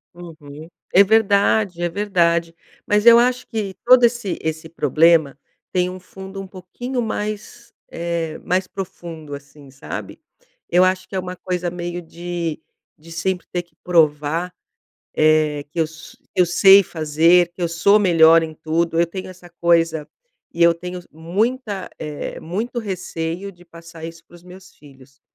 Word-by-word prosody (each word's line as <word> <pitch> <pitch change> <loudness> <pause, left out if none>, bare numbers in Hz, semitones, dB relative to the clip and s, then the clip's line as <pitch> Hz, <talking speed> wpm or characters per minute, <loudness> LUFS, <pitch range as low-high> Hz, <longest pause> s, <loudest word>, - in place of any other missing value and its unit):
Uhum. 160 -2 -11 0.2
É 200 - +8
verdade, 200 -3 +2
é 175 - +1
verdade. 170 -4 0 0.3
Mas 210 +2 +2
eu 235 0 +9
acho 250 +1 +1
que 210 -5 -4
todo 250 -1 +7
esse 235 -6 -1
esse 160 0 -4
problema 160 -4 +3 0.4
tem 180 0 +1
um 185 0 -8
fundo 190 +1 -9
um 195 - -9
pouquinho 240 +8 -5
mais 215 +2 -5 0.2
eh, 170 -2 -3
mais 185 +1 0
profundo, 165 -6 -8
assim, 140 0 -14
sabe. 135 0 -8 0.5
Eu 180 +1 +5
acho 185 0 -1
que 195 - -7
é - - +1
uma 180 0 -6
coisa 180 -1 -3
meio 175 0 -5
de 170 -1 -5 0.4
de 165 +2 -16
sempre 180 +2 -2
ter 175 - -1
que 170 - -35
provar, 165 0 +1 0.6
eh 155 -2 +2
que 170 - -2
eu - - +4
s 160 +1 -12 0.2
eu 180 -1 +4
sei 195 +3 +7
fazer 165 +3 +3
que 180 - -15
eu 175 - +1
sou 190 +5 +4
melhor 165 -4 +6
em 160 - -7
tudo. 165 +2 -1
Eu 170 - +3
tenho 185 +1 -6
essa 180 -1 -13
coisa 165 -3 +2 0.5
e 170 - +1
eu 170 - +7
tenho 180 +2 -7
muita 200 - -2
eh, 150 -2 -6
muito 215 +9 -4
receio 185 -3 -4
de 175 -1 -19
passar 165 -1 -12
isso 165 0 -9
para 175 - -17
os 175 - -19
meus 185 +1 -14
filhos. 135 -1 -19
175 Hz, 160 wpm, -20 LUFS, 165-190 Hz, 0.6 s, eu